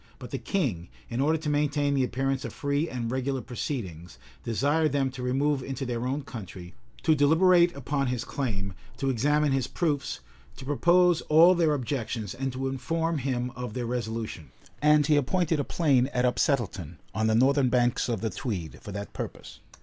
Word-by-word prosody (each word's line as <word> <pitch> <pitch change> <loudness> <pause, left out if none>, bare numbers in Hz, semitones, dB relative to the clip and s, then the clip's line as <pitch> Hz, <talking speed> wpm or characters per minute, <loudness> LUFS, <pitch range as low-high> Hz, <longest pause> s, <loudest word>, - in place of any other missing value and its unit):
But - - -10
the - - -3
king, 120 - -1 0.2
in 120 +3 -1
order 155 +3 +3
to 155 0 -6
maintain 145 -1 +1
the 135 -2 +2
appearance 135 +1 -1
of - - -6
free 145 +3 -1
and 120 -2 -3
regular 130 +1 -1
proceedings, 95 - -5 0.3
desired 145 +7 +1
them 135 -2 +1
to 130 -1 -8
remove 135 +3 +1
into 135 +1 -4
their 120 0 -2
own 140 +3 -2
country, 95 -8 -9 0.3
to 160 - +4
deliberate 170 +4 +4
upon 140 0 -1
his 125 -2 -2
claim, 100 -8 -3 0.2
to 135 +1 0
examine 145 +4 +2
his 135 -2 +1
proofs, 150 -5 -1 0.4
to - - -9
propose 175 +4 +4
all 165 +4 +7
their 165 -4 +2
objections, 120 -6 -3
and 135 +1 -3
to 130 +1 -3
inform 160 +5 -1
him 125 -2 -2
of 125 -3 -6
their 125 -1 -2
resolution; 110 - -4 0.3
and 150 0 +5
he 150 +1 +4
appointed 160 +3 +1
a - - +1
plain 135 -5 +2
at 125 -3 0
Upsettleton, 120 - 0 0.2
on 110 0 0
the 110 - +3
northern 135 +2 +4
banks 120 0 +1
of 115 -5 -1
the 110 - -1
Tweed, 90 - -4
for 105 - -8
that 100 -1 -6
purpose. - - -7
135 Hz, 180 wpm, -27 LUFS, 120-150 Hz, 0.4 s, all